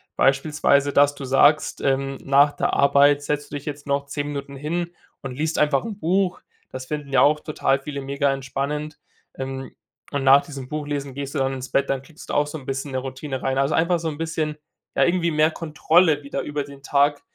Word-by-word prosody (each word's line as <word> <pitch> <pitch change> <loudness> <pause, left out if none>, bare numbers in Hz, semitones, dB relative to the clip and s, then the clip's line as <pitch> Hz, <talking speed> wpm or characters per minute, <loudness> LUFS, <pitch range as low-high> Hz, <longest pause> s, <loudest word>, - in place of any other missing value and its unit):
beispielsweise, 140 0 +2
dass 145 0 +4
du 140 - -8
sagst, 145 +3 +3
ähm, 135 0 0
nach 140 +2 +5
der - - -1
Arbeit 140 +1 +4
setzt 145 0 -3
du - - -5
dich 145 - -6
jetzt 145 -1 -6
noch 140 0 0
10 145 0 -3
Minuten 140 -1 -6
hin 170 +4 -3 0.3
und 135 - -6
liest 155 +2 -1
einfach 150 -2 +2
'n 215 -3 -5
Buch, 185 +2 0 0.3
das 130 0 -7
finden 150 -2 -5
ja 125 - +5
auch 150 +2 +4
total 140 -3 0
viele 140 0 -6
mega 140 +1 0
entspannend, 145 +3 -4 0.4
ähm, 135 0 -5 0.4
und 140 -1 -1
nach 135 +1 +7
diesem 135 -5 -8
Buchlesen 145 -2 -4
gehst 140 +2 -6
du - - 0
dann 135 0 0
ins 130 -1 -6
Bett, 140 +1 +1
dann 135 -1 0
kriegst 150 +3 -15
du - - -3
auch 145 - +2
so 150 - -6
'n 135 - -12
bisschen 135 +1 -4
'ne 130 - -2
Routine 130 +1 -5
rein. 135 0 0
Also, 135 +2 +1
einfach 170 +1 +2
so 165 - -2
'n 150 - -6
bisschen, 160 -1 -2 0.4
ja, - - +4
irgendwie 175 -1 +1
mehr 155 +1 +3
Kontrolle 160 0 +2
wieder 140 - -4
über 145 -1 -3
den 140 0 -13
Tag, 145 +1 +2
145 Hz, 215 wpm, -23 LUFS, 135-150 Hz, 0.4 s, nach